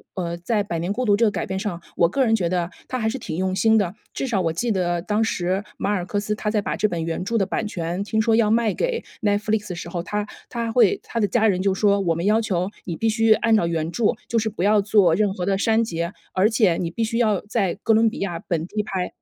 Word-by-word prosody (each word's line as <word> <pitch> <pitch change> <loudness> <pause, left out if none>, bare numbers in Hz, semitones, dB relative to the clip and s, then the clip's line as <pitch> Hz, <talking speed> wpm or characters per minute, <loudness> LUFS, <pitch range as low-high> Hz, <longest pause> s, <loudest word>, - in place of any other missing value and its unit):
呃， 170 -2 -3
在 205 +4 0
《百 170 -3 -2
年 175 +4 -2
孤 250 +4 -1
独》 205 - +4
这 230 - +1
个 215 - +4
改 - - -3
编 190 0 -3
上， 195 -4 -3 0.2
我 170 - +3
个 265 +7 +1
人 225 -1 +3
觉 180 -6 0
得 175 -1 0 0.2
它 255 - -3
还 220 - 0
是 250 +4 -2
挺 160 -8 -5
用 185 0 0
心 220 +2 +4
的， 190 -4 0 0.2
至 - - -2
少 220 -7 0
我 165 -2 0
记 225 +8 -1
得 175 -3 0
当 210 +2 +1
时， 190 -2 -1
马 200 - -1
尔 185 -4 0
克 205 +2 -2
斯 210 +1 -2
他 210 0 -2
在 210 - +1
把 205 - -2
这 215 - +1
本 170 -4 -3
原 165 +2 -3
著 230 +4 -1
的 195 - +2
版 210 +3 -2
权 175 0 -3
听 220 +1 -1
说 220 0 +3
要 220 -2 +3
卖 225 -1 +2
给 - - -1 0.2
Netflix 210 0 0
的 180 - -4
时 170 - -7
候， 170 0 -3
他 210 +3 -3 0.2
他 230 -1 -3
会 315 - +4
他 230 - -4
的 205 - +2
家 220 +1 +2
人 185 -3 +1
就 195 0 +1
说： 200 0 +3
“我 170 -3 +1
们 170 +2 -3
要 215 +2 +3
求 185 -4 -1 0.2
你 170 - -3
必 225 - -1
须 225 0 +4
按 225 0 +2
照 175 -6 +2
原 165 -1 -2
著， 230 +4 -1 0.2
就 235 - +1
是 220 0 -1
不 190 -4 -4
要 210 +1 +4
做 200 -4 +4
任 205 +2 +2
何 180 - -3
的 195 +1 +1
删 225 +2 +3
节， 170 -4 -3 0.2
而 190 +3 +3
且 215 -7 +3
你 170 - -2
必 225 +7 -2
须 230 +1 -1
要 215 -5 +2
在 205 -5 0
哥 225 - +3
伦 225 +1 +4
比 - - -9
亚 175 -4 -3
本 165 -2 -2
地 210 +4 -2
拍。” 190 -3 -3
205 Hz, 320 characters per minute, -23 LUFS, 180-220 Hz, 0.2 s, 独